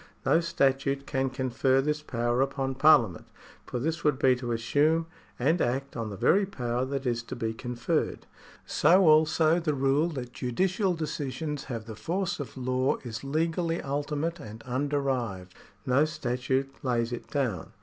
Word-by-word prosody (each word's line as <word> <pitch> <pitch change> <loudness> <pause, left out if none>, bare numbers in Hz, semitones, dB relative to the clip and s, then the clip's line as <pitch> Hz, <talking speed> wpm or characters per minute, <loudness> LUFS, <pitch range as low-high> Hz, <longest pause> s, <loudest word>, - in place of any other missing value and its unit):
No 165 - +4
statute 140 -4 0
can 135 -1 -1
confer 130 +1 +1
this 150 +2 0
power 120 -3 0
upon 135 0 -1
Parliament, 130 - +4 0.4
for - - -3
this 160 +5 -2
would 150 -3 +2
be 130 -1 +4
to 125 -1 -4
assume 145 +8 +2 0.3
and 155 +8 +2
act 135 +3 -1
on 115 -3 -3
the 100 - -7
very 195 - +3
power 125 -8 -2
that 135 0 -4
is 120 -2 0
to 115 - -7
be 115 -2 -2
conferred. 120 +1 -2 0.4
So 185 +1 +4
also 155 +1 +4
the 155 -4 -1
rule 135 +4 +2
that 130 -7 -6
judicial 185 - 0
decisions 150 -1 -4
have 115 -4 -5
the 110 - -7
force 175 - -2
of 140 -1 -7
law 130 +1 0
is 115 -1 -6
legally 165 +4 0
ultimate 145 +4 -2
and 110 -5 -9
underived. 130 -8 -2 0.3
No 135 +4 +4
statute 130 -1 -2
lays 120 -2 0
it 120 - -6
down. 125 - -2
135 Hz, 160 wpm, -28 LUFS, 125-155 Hz, 0.4 s, No